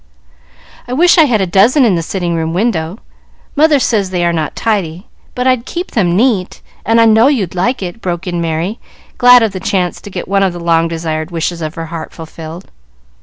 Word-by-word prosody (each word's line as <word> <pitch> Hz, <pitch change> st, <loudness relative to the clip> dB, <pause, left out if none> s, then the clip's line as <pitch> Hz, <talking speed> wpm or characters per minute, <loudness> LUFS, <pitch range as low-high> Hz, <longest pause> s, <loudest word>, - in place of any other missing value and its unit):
"I 245 Hz, -, -4 dB
wish 345 Hz, +5 st, +4 dB
I 320 Hz, -, +7 dB
had 230 Hz, -7 st, +1 dB
a -, -, +1 dB
dozen 220 Hz, -, +4 dB
in 215 Hz, -, +3 dB
the 170 Hz, -, 0 dB
sitting 175 Hz, 0 st, -3 dB
room 165 Hz, 0 st, -2 dB
window. 185 Hz, -4 st, -1 dB, 0.6 s
Mother 305 Hz, 0 st, +4 dB
says 215 Hz, -7 st, 0 dB
they 180 Hz, -2 st, -1 dB
are 170 Hz, -, +1 dB
not 160 Hz, -2 st, -3 dB
tidy, 190 Hz, -5 st, -2 dB, 0.3 s
but 250 Hz, -, -2 dB
I'd 255 Hz, -2 st, +1 dB
keep 350 Hz, +1 st, -5 dB
them 175 Hz, -6 st, +1 dB
neat, 210 Hz, -4 st, 0 dB, 0.2 s
and 225 Hz, +1 st, +2 dB
I 230 Hz, -, +6 dB
know 225 Hz, +2 st, +5 dB
you'd 225 Hz, -, 0 dB
like 195 Hz, +6 st, -1 dB
it," 185 Hz, +5 st, -7 dB
broke 175 Hz, 0 st, -3 dB
in 175 Hz, -2 st, -2 dB
Merry, 165 Hz, +6 st, -2 dB, 0.4 s
glad 245 Hz, -1 st, +7 dB
of 220 Hz, -, 0 dB
the 190 Hz, -, -6 dB
chance 180 Hz, -2 st, -2 dB
to -, -, -10 dB
get 185 Hz, -2 st, -6 dB
one 195 Hz, +1 st, +1 dB
of 190 Hz, -2 st, +1 dB
the 175 Hz, -, -7 dB
long 165 Hz, -1 st, +2 dB
desired 160 Hz, -1 st, -4 dB
wishes 170 Hz, 0 st, -3 dB
of 155 Hz, 0 st, -5 dB
her 165 Hz, -, -5 dB
heart 160 Hz, -1 st, -6 dB
fulfilled. 160 Hz, +2 st, -10 dB
185 Hz, 215 wpm, -14 LUFS, 170-230 Hz, 0.6 s, I